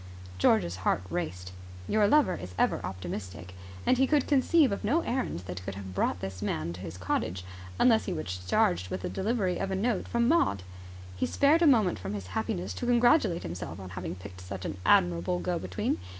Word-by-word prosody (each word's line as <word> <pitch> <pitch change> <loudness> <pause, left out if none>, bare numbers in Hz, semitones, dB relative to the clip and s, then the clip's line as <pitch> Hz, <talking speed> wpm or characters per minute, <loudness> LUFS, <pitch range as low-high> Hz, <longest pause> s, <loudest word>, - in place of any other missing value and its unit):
George's 90 -3 +3
heart 95 0 0
raced. 90 - -4 0.4
Your 210 -1 +3
lover 300 +5 +4
is 90 0 -7
ever - - +2
optimistic, 90 0 -6 0.3
and 255 - +3
he 265 - +4
could 295 -2 +2
conceive 285 0 +4
of 200 - -3
no 290 +11 +2
errand 255 - -2
that 90 0 -7
could 95 +1 -5
have 95 -1 -8
brought 90 - 0
this 95 -1 -6
man 85 -4 -2
to 90 - -9
his 90 -2 -7
cottage 90 0 -2 0.3
unless 230 -3 +4
he 190 - -2
was 90 - -4
charged 90 0 +2
with 95 - -4
the - - -2
delivery 190 - -1
of 195 - -2
a 190 - -1
note 215 +1 0
from 235 0 +1
Maud. 240 - +2 0.5
He 90 - -1
spared 300 +4 +3
a 335 - +6
moment 220 -10 +4
from 95 +2 -4
his 100 -2 -5
happiness 90 +3 -2
to 245 - -4
congratulate 240 - +3
himself 80 0 -6
on 95 -1 -8
having 90 -1 -5
picked 90 0 -10
such 90 0 -7
an - - -4
admirable 90 0 +3
go 90 - -2
between. - - -2
95 Hz, 200 wpm, -29 LUFS, -, 0.5 s, a